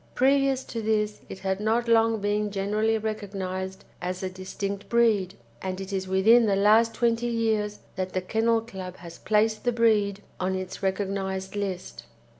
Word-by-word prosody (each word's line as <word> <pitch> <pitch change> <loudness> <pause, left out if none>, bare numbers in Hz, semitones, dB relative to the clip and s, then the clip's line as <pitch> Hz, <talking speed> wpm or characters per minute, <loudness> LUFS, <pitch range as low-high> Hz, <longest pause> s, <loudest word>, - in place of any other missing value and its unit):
Previous 270 0 +3
to 230 - -5
this 210 -1 0
it - - -7
had 190 0 -1
not 225 +3 +1
long 225 -1 +3
been 205 +1 0
generally 210 +3 0
recognised 190 -3 -4 0.2
as 180 +1 -3
a 185 - -2
distinct 195 +2 -5
breed, 220 -6 +2 0.3
and 185 0 -3
it 195 +1 -6
is 190 -1 -2
within 220 +5 +5
the 200 - +3
last 220 +3 +4
twenty 235 0 +1
years 220 -3 0 0.2
that 185 0 -3
the 185 - 0
Kennel 225 +4 +1
Club 190 -5 -8
has 170 -1 -11
placed 215 0 +1
the 245 - +2
breed 210 -4 +2 0.2
on 185 +1 0
its 185 0 -5
recognised 190 0 -2
list. 195 -3 -4
205 Hz, 165 wpm, -26 LUFS, 190-225 Hz, 0.3 s, within